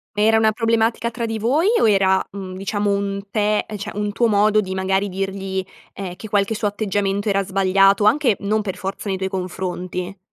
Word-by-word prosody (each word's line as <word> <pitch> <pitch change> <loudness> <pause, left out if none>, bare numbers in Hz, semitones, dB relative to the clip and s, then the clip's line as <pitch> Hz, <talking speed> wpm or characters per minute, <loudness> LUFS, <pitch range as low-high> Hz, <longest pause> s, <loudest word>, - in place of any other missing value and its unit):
Ma 210 - +1
era 220 +1 +5
una 220 0 +4
problematica 230 +1 +1
tra 235 0 -3
di 225 0 -3
voi 265 - +1
o - - +4
era, 190 -2 +3
mhmm, 190 -2 -7
diciamo 205 +2 -1
un 200 0 -1
te 210 0 +1
cioè, 205 +2 -6
un 210 0 -2
tuo 235 +4 +2
modo 210 0 +3
di 190 -3 -2
magari 190 +1 0
dirgli, 195 0 -3 0.3
ehm, 185 -3 -6
che 220 - -9
qualche 205 +1 +1
suo 215 0 -1
atteggiamento 205 0 -1
era 195 0 +2
sbagliato, 195 +1 +3
anche 255 0 +4
non 210 +2 0
per 190 -3 -4
forza 195 +3 -5
nei 190 -1 -1
tuoi 190 0 -2
confronti? 185 0 -4
200 Hz, 200 wpm, -21 LUFS, 190-215 Hz, 0.3 s, era